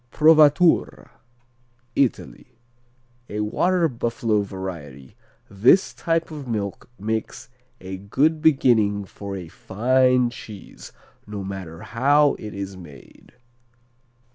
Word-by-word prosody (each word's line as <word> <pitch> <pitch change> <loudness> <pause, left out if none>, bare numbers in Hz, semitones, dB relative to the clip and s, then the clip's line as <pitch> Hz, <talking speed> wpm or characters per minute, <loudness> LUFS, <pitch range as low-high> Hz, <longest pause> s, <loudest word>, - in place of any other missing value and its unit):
Provatura 155 - +4 0.8
Italy 125 -2 -2 0.7
A 105 +1 -3
water 170 +11 +1
buffalo 115 -4 -1
variety. 85 -9 -8 0.3
This 115 - +3
type 165 0 -1
of 145 -4 -8
milk 105 -1 -4
makes 110 +2 -4 0.3
a 95 0 -7
good 145 +11 0
beginning 110 -9 +3
for 100 +1 -8
a 90 -3 -7
fine 125 +7 +1
cheese, 110 -4 -11 0.4
no 105 -2 -6
matter 95 -4 -7
how 145 +4 +3
it 105 -1 -8
is 100 -1 -6
made. 80 -7 -15
110 Hz, 100 wpm, -23 LUFS, 95-135 Hz, 0.8 s, Provatura